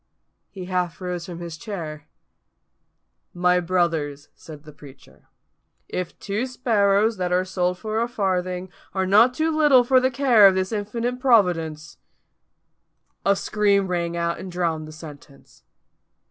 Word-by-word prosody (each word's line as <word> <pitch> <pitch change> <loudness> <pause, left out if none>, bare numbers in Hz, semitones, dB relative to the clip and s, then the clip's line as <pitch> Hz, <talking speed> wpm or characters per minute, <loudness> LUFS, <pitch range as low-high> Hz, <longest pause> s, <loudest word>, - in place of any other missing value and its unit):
He 190 -3 -9
half 180 -2 -2
rose 180 -2 -5
from 175 -1 -8
his 170 -2 -7
chair. 155 -7 -7 1.3
"My 180 0 +3
brothers," 165 -5 -1
said 150 -2 -13
the 150 -1 -13
preacher, 140 -2 -17 0.6
"if 180 -2 -5
two 215 +5 -3
sparrows, 220 -4 +1
that 180 -1 -2
are 180 +1 +1
sold 180 -1 -1
for 215 +3 -3
a 235 - 0
farthing, 185 -5 -2 0.2
are 190 0 0
not 220 +7 +5
too 315 +2 0
little 290 -5 +5
for 255 +1 +4
the 260 +1 +1
care 245 -6 +5
of 190 - +3
this 190 +1 -1
infinite 230 +4 -3
Providence 175 - +1 0.7
" - - -49
A - - +3
scream 200 -1 +1
rang 170 -1 -2
out 170 0 -2
and 185 - -8
drowned 165 -3 -2
the - - -10
sentence. 150 -3 -14
185 Hz, 145 wpm, -23 LUFS, 170-215 Hz, 1.3 s, not